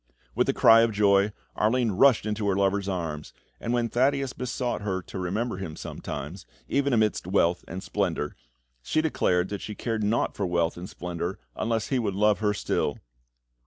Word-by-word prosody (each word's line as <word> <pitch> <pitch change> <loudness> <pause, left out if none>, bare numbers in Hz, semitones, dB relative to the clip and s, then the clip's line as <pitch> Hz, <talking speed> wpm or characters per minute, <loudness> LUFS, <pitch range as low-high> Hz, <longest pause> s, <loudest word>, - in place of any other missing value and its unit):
With - - +1
a - - +3
cry 115 0 +7
of 115 0 +3
joy, 100 0 +4 0.2
Arline 115 +1 +2
rushed 125 +5 +4
into 105 -1 -1
her 95 - +2
lover's 100 0 +1
arms, 80 -5 -4 0.3
and 115 - -3
when 120 -1 +1
Thaddeus 135 +2 +1
besought 125 -1 -3
her 95 -3 -2
to 95 - -7
remember 100 +5 -2
him 85 -5 -6
sometimes, 75 +7 -7 0.2
even 140 0 +1
amidst 110 -6 +1
wealth 90 -2 +2
and 95 +2 -6
splendour, 75 - -2 0.5
she 155 - +1
declared 90 - +1
that 100 -1 -4
she 105 - -6
cared 115 -1 -2
naught 110 +3 +1
for 100 - -1
wealth 85 -1 +1
and 90 +2 -8
splendour 90 +1 -4 0.2
unless 115 -1 -1
he 130 - +1
would 100 -5 -1
love 105 +1 +3
her 105 -1 +2
still. - - -1
105 Hz, 180 wpm, -26 LUFS, 90-115 Hz, 0.5 s, cry